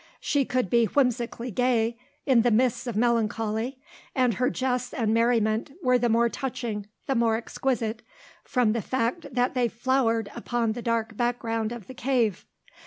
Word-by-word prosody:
She 285 -2 +1
could 250 -4 0
be 235 +4 +3
whimsically 245 -1 0
gay 235 0 +1 0.3
in 260 -5 +5
the 240 - +3
midst 245 +2 +2
of 235 - -3
melancholy, 225 +1 0 0.4
and 255 -3 +3
her 250 +5 +1
jests 250 -1 -2
and 220 -3 +1
merriment 230 0 +2
were 250 0 +4
the 240 0 +1
more 230 +1 +4
touching, 230 -5 -4 0.2
the 270 - 0
more 230 -3 +2
exquisite, 230 -1 -2 0.4
from 245 -4 +1
the 230 - -1
fact 260 - -1
that 250 0 +1
they 250 -2 +2
flowered 230 -2 0
upon 235 -1 -1
the 240 +2 -5
dark 230 -1 -1
background 230 -1 -1
of 240 -5 -7
the 260 - -10
cave. 240 -6 0
235 Hz, 165 wpm, -26 LUFS, 225-250 Hz, 0.4 s, in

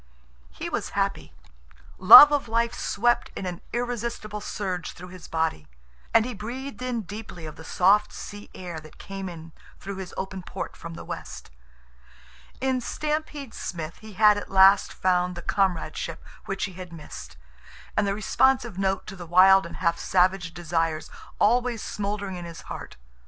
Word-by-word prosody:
He - - -6
was - - -4
happy. - - -1 0.7
Love 225 +10 +12
of 290 -4 0
life 230 +1 +1
swept 240 +3 +1
in - - -5
an 180 -1 -5
irresistible 235 -3 -3
surge 185 -4 -4
through 180 +1 -11
his 185 -2 -11
body, 160 - -1 0.4
and 225 - +5
he 250 - -4
breathed 250 +6 -7
in 250 -2 -2
deeply 205 -4 -8
of 155 - -8
the 160 - -11
soft 195 +5 +3
sea 205 0 -9
air 175 -3 -6
that 155 0 -15
came 195 -1 -6
in 165 -1 -10 0.3
through 200 0 -6
his 190 -2 -7
open 190 0 -4
port - - -6
from 165 0 -9
the - - -9
west. - - -8 1.1
In 260 -1 0
Stampede 300 -1 -3
Smith 165 -2 -6
he 220 -1 -12
had 210 +1 +5
at - - -9
last 195 +1 +6
found 180 -1 +1
the 175 - -8
comradeship 170 -4 -1 0.2
which 195 -1 -3
he 190 - -3
had 180 -1 -9
missed, 75 - -10 0.6
and 210 - +2
the 195 - 0
responsive 235 0 +2
note 195 -1 0
to 195 - -8
the 175 -2 -9
wild 190 +2 +6
and - - -10
half 170 0 0
savage 185 -2 +2
desires 165 -2 -2 0.3
always 240 +1 +2
smoldering 200 -2 -4
in 175 - -7
his 170 -1 -9
heart. - - -9
195 Hz, 165 wpm, -26 LUFS, 175-220 Hz, 1.1 s, Love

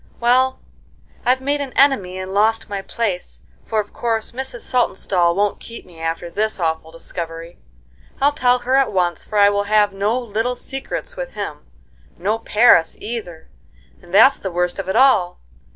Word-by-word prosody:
Well, 255 +2 +3 0.7
I've 255 +1 +3
made 285 +2 -1
an 270 -3 -5
enemy 205 -10 +3
and 185 0 -6
lost 220 +2 +2
my 200 -2 -4
place, 195 -3 -4 0.2
for 220 - 0
of 210 -1 -4
course 225 -2 -2
Mrs. 255 -1 -6
Saltonstall 190 -7 +1
won't 205 +1 0
keep 230 - -10
me 170 -2 -16
after 165 +1 -3
this 210 +4 -2
awful 160 -1 -1
discovery. 165 0 -8 0.6
I'll 285 +1 +4
tell 250 -3 +2
her 250 +1 -3
at 270 -1 +2
once, 175 -4 0
for 215 - -4
I 205 0 +6
will 205 0 0
have 210 -1 +3
no 205 +5 0
'little 235 +1 -2
secrets' 270 - -6
with - - -6
him. - - -6 0.5
No 210 +6 -1
Paris 215 -7 +4
either, 210 -8 -7 0.5
and 175 - -17
that's 265 +8 +6
the 190 - -4
worst 180 +1 -1
of 195 - -4
it - - -1
all! 255 -10 +4
210 Hz, 170 wpm, -20 LUFS, 180-245 Hz, 0.7 s, I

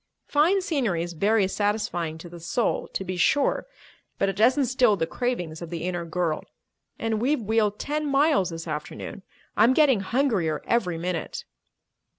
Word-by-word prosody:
Fine 335 +7 +3
scenery 245 - 0
is 175 0 -6
very 200 +4 +2
satisfying 205 -6 -1
to 165 - -10
the 170 0 -10
soul, 185 +8 -1
to - - -4
be 185 0 -4
sure, 280 - +2 0.5
but 195 - +1
it 195 - -3
doesn't 250 +7 +4
still 245 -3 +3
the 165 -4 -1
cravings 175 -7 -3
of 170 - -6
the 170 -1 -5
inner 175 -1 -2
girl. 165 -1 -1 0.5
And 225 -1 -1
we've 280 +4 +2
wheeled 210 -1 +1
ten 300 +1 -2
miles 280 - +3
this 165 0 -7
afternoon. 155 +6 -6 0.3
I'm 235 +5 +5
getting 280 -8 +5
hungrier 195 - 0
every 180 -8 +1
minute." 175 0 -4
205 Hz, 160 wpm, -25 LUFS, 170-250 Hz, 0.5 s, I'm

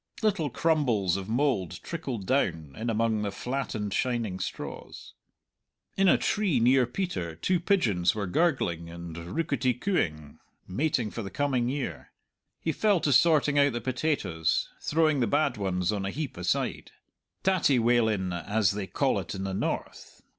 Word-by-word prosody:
Little 195 -9 +1
crumbles 120 - +1
of 100 +1 -5
mould 110 - 0
trickled 135 - -5
down, 80 - 0
in 115 +2 -3
among 110 -1 +1
the 105 - -1
flattened 110 -3 -3
shining 115 -7 -1
straws. - - -7 0.8
In 195 0 +3
a - - +6
tree 200 - +1
near 125 +1 +4
Peter 120 - -3
two 180 - +1
pigeons 115 - +2
were 105 -2 -2
gurgling 90 - 0
and 85 -1 -8
rookety 130 - -1
cooing, 80 - -2 0.3
mating 120 +1 0
for 115 - -5
the 100 - -5
coming 125 +1 0
year. 125 - -4 0.5
He 160 - 0
fell 205 +3 +2
to 145 - +2
sorting 150 -1 +4
out 140 -2 +4
the 120 - -2
potatoes, 120 - 0
throwing 155 -2 +2
the 120 - +2
bad 145 +2 +2
ones 95 -2 0
on 100 -2 -2
a 95 - -2
heap 145 +5 -4
aside 90 0 -1 0.5
"tattie 185 -8 +3
walin'," 110 -6 +2
as 100 +3 +1
they 100 -1 -4
call - - +1
it - - -6
in 95 - -4
the 95 -1 -3
north. 95 - -4
120 Hz, 155 wpm, -28 LUFS, 95-145 Hz, 0.8 s, a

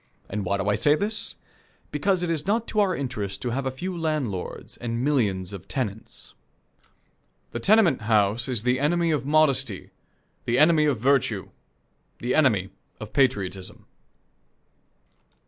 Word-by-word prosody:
And 100 0 -3
why 100 +2 0
do 95 0 -3
I 105 - +3
say 145 +7 +4
this? 210 +6 -1 0.6
Because 180 +5 0
it 175 - -1
is 160 0 -2
not 225 +3 +1
to 215 - 0
our 195 -3 +2
interest 105 -8 -4
to 120 - -2
have 135 +2 -2
a - - +1
few 175 +8 -5
landlords 150 - -3
and 115 0 -3
millions 100 -10 0
of 95 - -9
tenants. 110 -6 -5 1.2
The 120 - -4
tenement 185 - +4
house 105 +2 +2
is 120 -5 -2
the 125 +1 +1
enemy 165 +3 +1
of 145 -3 -1
modesty, 135 -8 +1 0.5
the 120 - +1
enemy 155 +1 +5
of 140 -7 +1
virtue, 135 +1 +1 0.7
the 120 +1 -2
enemy 110 -11 +2 0.3
of 110 -1 -9
patriotism. 100 -9 -1
130 Hz, 145 wpm, -25 LUFS, 105-155 Hz, 1.2 s, enemy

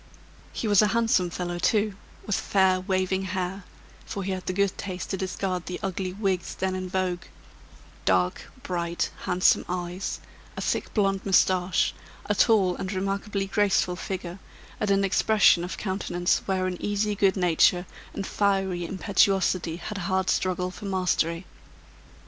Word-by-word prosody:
He 225 - -3
was 205 -1 +6
a 210 - +4
handsome 225 -6 +2
fellow 175 0 -4
too, 210 +2 +2 0.3
with 210 - 0
fair 190 -2 +2
waving 185 0 0
hair 185 0 -3 0.4
(for 200 - -5
he 195 - -2
had 185 -1 -5
the - - +1
good 200 +1 +1
taste 185 -2 -5
to 190 - -1
discard 185 -1 -3
the 180 - -4
ugly 190 -1 -2
wigs 190 -2 -2
then 190 0 -1
in 185 0 -4
vogue), 180 -1 -1 0.8
dark, 90 -1 +1
bright, 170 -1 -2
handsome 180 +1 +3
eyes, 180 +1 -3 0.4
a - - -3
thick - - -1
blonde 195 -2 +1
moustache, 185 -2 +3 0.3
a 210 - +1
tall 195 -4 +4
and 190 - -4
remarkably 195 +1 -2
graceful 195 -2 +1
figure, 180 0 -5 0.4
and 210 - 0
an 195 0 +3
expression 195 -2 +4
of 180 - -5
countenance 180 -3 0
wherein 185 -2 -1
easy 205 +1 0
good 195 -1 +2
nature 180 0 +3 0.3
and 195 - -4
fiery 195 -3 0
impetuosity 190 -2 +1
had 200 +4 -6
a 175 - -3
hard 190 0 +1
struggle 180 0 0
for 205 - -10
mastery. 180 -2 0
190 Hz, 150 wpm, -26 LUFS, 180-195 Hz, 0.8 s, was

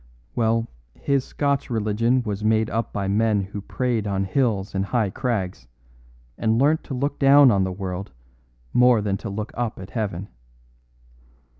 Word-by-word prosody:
Well, 115 0 +1 0.3
his 140 -2 0
Scotch 140 -2 -1
religion 115 +2 +1
was 105 -2 -4
made 110 0 +2
up 115 0 -2
by 100 -1 -2
men 105 +1 +2
who 100 +1 -6
prayed 115 0 -1
on 95 -1 0
hills 105 -2 0
and 95 0 0
high 110 -3 0
crags, 95 - -3 0.7
and 110 0 +2
learnt 150 +5 +3
to 135 - -5
look 140 +3 -2
down 140 -1 +7
on 100 -3 +2
the 95 - -3
world 95 -1 -5 0.6
more 125 -2 +5
than 100 -2 0
to 100 - -6
look 105 +2 -4
up 120 -2 -3
at 95 - -9
heaven. 105 -4 -3
110 Hz, 160 wpm, -23 LUFS, 100-125 Hz, 0.7 s, down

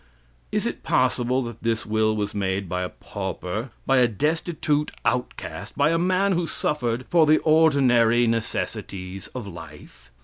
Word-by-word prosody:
Is - - 0
it - - -3
possible 130 0 +1
that 120 -1 -8
this 115 -1 -1
will 110 0 +1
was 105 -1 -2
made 95 -1 -1
by 90 +1 -2
a 90 - -2
pauper, 95 +4 -5 0.2
by 135 - +3
a 125 -1 +5
destitute 150 - 0 0.2
outcast, 115 -6 -3
by 145 +2 +3
a 165 - +2
man 185 +3 +2
who 175 -2 0
suffered 125 -5 -1
for 165 -3 +4
the 155 +1 +6
ordinary 130 -7 +4
necessities 95 -4 -3
of 125 -4 -4
life? 80 -9 -12
120 Hz, 150 wpm, -24 LUFS, 100-150 Hz, 0.2 s, the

